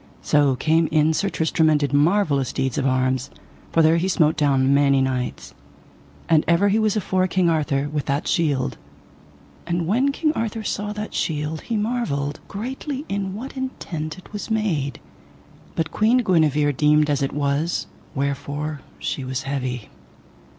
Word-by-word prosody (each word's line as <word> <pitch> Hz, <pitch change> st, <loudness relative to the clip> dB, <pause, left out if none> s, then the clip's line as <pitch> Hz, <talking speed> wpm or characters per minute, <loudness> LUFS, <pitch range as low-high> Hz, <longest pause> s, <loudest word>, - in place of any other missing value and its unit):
So 145 Hz, -3 st, +3 dB
came 160 Hz, +4 st, +2 dB
in 155 Hz, 0 st, +3 dB
Sir 195 Hz, +5 st, 0 dB
Tristram 160 Hz, -2 st, +2 dB
and 150 Hz, -1 st, +3 dB
did 145 Hz, -1 st, -1 dB
marvellous 145 Hz, -3 st, +2 dB
deeds 135 Hz, -1 st, -1 dB
of 135 Hz, -, +1 dB
arms, 130 Hz, 0 st, 0 dB, 0.4 s
for 165 Hz, -, +4 dB
there 160 Hz, +1 st, +5 dB
he 175 Hz, +3 st, 0 dB
smote 160 Hz, -4 st, +3 dB
down 140 Hz, -3 st, +3 dB
many 140 Hz, -1 st, +4 dB
knights. 130 Hz, -2 st, -2 dB, 0.7 s
And 160 Hz, -2 st, +4 dB
ever 170 Hz, +5 st, +4 dB
he 210 Hz, +3 st, +2 dB
was 215 Hz, -1 st, +2 dB
afore 185 Hz, -2 st, +1 dB
King 180 Hz, -1 st, +2 dB
Arthur 145 Hz, -3 st, 0 dB
with 150 Hz, -1 st, -3 dB
that 140 Hz, +3 st, -1 dB
shield. 145 Hz, -6 st, 0 dB, 0.9 s
And 170 Hz, -1 st, 0 dB
when 250 Hz, +10 st, +2 dB
King 305 Hz, +2 st, 0 dB
Arthur 225 Hz, -4 st, -3 dB
saw 210 Hz, 0 st, -2 dB
that 210 Hz, 0 st, -6 dB
shield 150 Hz, 0 st, -2 dB
he 230 Hz, -, -2 dB
marvelled 205 Hz, -11 st, -1 dB
greatly 265 Hz, +6 st, -5 dB
in 195 Hz, -1 st, -2 dB
what 260 Hz, +7 st, -7 dB
intent 180 Hz, -, -5 dB
it 185 Hz, -, -15 dB
was 210 Hz, -, -5 dB
made; 180 Hz, -11 st, -1 dB, 0.8 s
but 165 Hz, -1 st, -1 dB
Queen 235 Hz, +4 st, +3 dB
Guenever 150 Hz, -, +3 dB
deemed 150 Hz, +2 st, +3 dB
as 145 Hz, -2 st, 0 dB
it 135 Hz, -, 0 dB
was, 145 Hz, +3 st, -1 dB, 0.3 s
wherefore 140 Hz, +2 st, -3 dB, 0.2 s
she 135 Hz, -, -3 dB
was 130 Hz, 0 st, -3 dB
heavy. 130 Hz, -4 st, -3 dB
155 Hz, 160 wpm, -22 LUFS, 140-200 Hz, 0.9 s, there